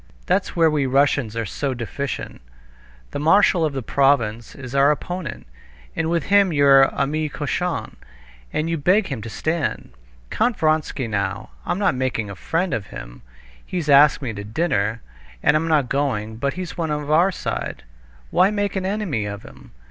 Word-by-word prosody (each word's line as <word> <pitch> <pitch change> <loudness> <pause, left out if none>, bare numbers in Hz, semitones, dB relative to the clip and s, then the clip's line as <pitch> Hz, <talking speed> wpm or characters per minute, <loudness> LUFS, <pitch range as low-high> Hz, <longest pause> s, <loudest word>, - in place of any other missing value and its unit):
That's - - 0
where 165 -2 +4
we 145 -3 +1
Russians 135 -4 +2
are 115 -1 -2
so 135 +7 -3
deficient. 125 - -5 0.7
The - - -4
marshal 170 +2 +4
of 155 -2 0
the 135 -2 -4
province 120 -5 +1
is 125 -2 -9
our 140 +1 +5
opponent, 160 -2 -3 0.5
and 165 0 -1
with 170 -2 0
him 200 0 +4
you're 140 -2 +6
ami 155 +2 -1
cochon, 165 +5 -3 0.5
and 155 - -1
you 165 -1 -1
beg 190 +7 +2
him 135 -6 -4
to 115 - -7
stand. 160 - -2 0.4
Count 240 -2 +1
Vronsky, 155 -5 0
now... 100 - -3 0.2
I'm - - 0
not 200 -2 +2
making 125 -5 -2
a - - -7
friend 170 - -1
of 100 -4 -3
him; - - -10 0.4
he's 170 -5 -4
asked 145 +1 +6
me 120 -4 -3
to 100 -1 -6
dinner, 110 -3 -1 0.4
and 150 - +4
I'm 160 +2 +1
not 150 -5 +2
going; 110 -6 -1
but 140 +4 -1
he's 180 -2 -6
one 165 -2 -2
of 150 0 -2
our 170 +5 +4
side—why - - -2
make 205 -1 -1
an 190 -1 -1
enemy 190 - -2
of 100 +1 -6
him? - - -14
145 Hz, 170 wpm, -22 LUFS, 115-165 Hz, 0.7 s, you're